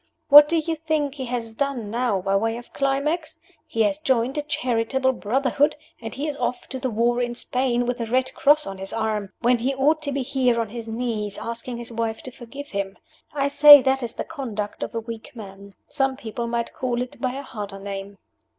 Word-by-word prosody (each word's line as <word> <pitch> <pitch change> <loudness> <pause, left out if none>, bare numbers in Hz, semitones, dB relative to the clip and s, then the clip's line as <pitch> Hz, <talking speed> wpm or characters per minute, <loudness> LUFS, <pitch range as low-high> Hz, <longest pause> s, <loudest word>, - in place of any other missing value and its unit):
What 295 +1 +10
do 335 - +2
you 325 +1 -1
think 310 -3 -1
he 270 -2 -5
has 235 -2 -4
done 245 -4 -2
now 230 -5 0
by 195 +1 0
way 225 +3 0
of 240 - -12
climax? 300 +4 -1 0.3
He 225 - +1
has 200 -1 0
joined 255 +2 +1
a 295 - 0
charitable 260 -2 0
brotherhood; 265 +5 +1 0.3
and 225 -1 -5
he 280 - -3
is 295 - -3
off 250 - -2
to 260 - -4
the 260 0 -1
war 240 +2 +1
in 240 0 -2
Spain 250 -1 0
with 245 0 -2
a 230 - -2
red 255 +3 0
cross 300 0 +4
on 195 -1 -7
his 195 0 -5
arm, 215 -3 -2
when 240 0 +3
he 265 +4 -1
ought 300 +4 +2
to 285 -2 -3
be 275 -1 -1
here 250 -2 +1
on 225 -2 -2
his 230 +1 -7
knees, 225 -3 -3
asking 235 +1 -5
his 235 0 -8
wife 225 -1 -3
to 255 - -7
forgive 275 +4 -10
him. 195 -1 -3 0.3
I 280 -1 0
say 290 -1 +9
that 265 0 +2
is 235 -1 -4
the - - -4
conduct 220 -9 -5
of - - -4
a - - 0
weak 225 +1 -8
man. 200 -2 -11
Some 270 -1 0
people 235 -2 -5
might 235 0 -2
call 245 -2 -2
it 250 - -11
by 255 -2 0
a 275 +1 -5
harder 205 -6 -7
name." 195 0 -7
245 Hz, 220 wpm, -23 LUFS, 225-275 Hz, 0.3 s, What